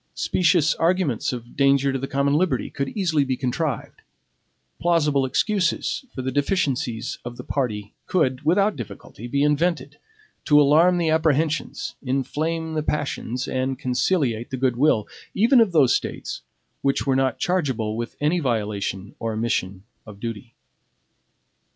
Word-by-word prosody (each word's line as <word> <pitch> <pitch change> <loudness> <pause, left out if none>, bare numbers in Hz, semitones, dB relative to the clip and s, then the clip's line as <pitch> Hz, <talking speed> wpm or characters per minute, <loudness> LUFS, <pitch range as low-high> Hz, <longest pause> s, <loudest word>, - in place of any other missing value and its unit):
Specious 165 -4 +2
arguments 165 - +1
of 120 -1 -8
danger 140 0 +3
to 135 - -1
the 135 - -4
common 140 +1 +1
liberty 170 +4 +1
could 140 -1 -3
easily 170 -7 +2
be 130 -2 -2
contrived; 135 +1 -3 0.8
plausible 150 -5 +2
excuses 200 - 0
for 130 - -4
the 130 - -2
deficiencies 135 - -1
of 120 0 -7
the - - -7
party 105 -7 -3
could, 130 -7 +1
without 195 +7 +3
difficulty, 120 -1 -9
be 140 +3 +1
invented 160 +4 0 0.5
to 150 0 +6
alarm 160 +5 +5
the 165 -2 +1
apprehensions, 160 0 0
inflame 160 +5 -2
the 155 - 0
passions, 135 -4 -2
and 130 0 -1
conciliate 125 -2 0
the 130 - -4
good 130 -1 +1
will, 120 -5 +2 0.3
even 235 +5 +5
of 220 -5 +3
those 145 -7 +4
States - - -4 0.4
which 135 0 0
were 135 -2 +2
not 130 -1 +1
chargeable 130 -12 -1
with 115 +1 -5
any 150 +4 +1
violation 105 - -2
or 115 -1 -2
omission 100 -4 -2 0.2
of 100 -2 -11
duty. 115 +1 -6
140 Hz, 145 wpm, -23 LUFS, 120-160 Hz, 0.8 s, to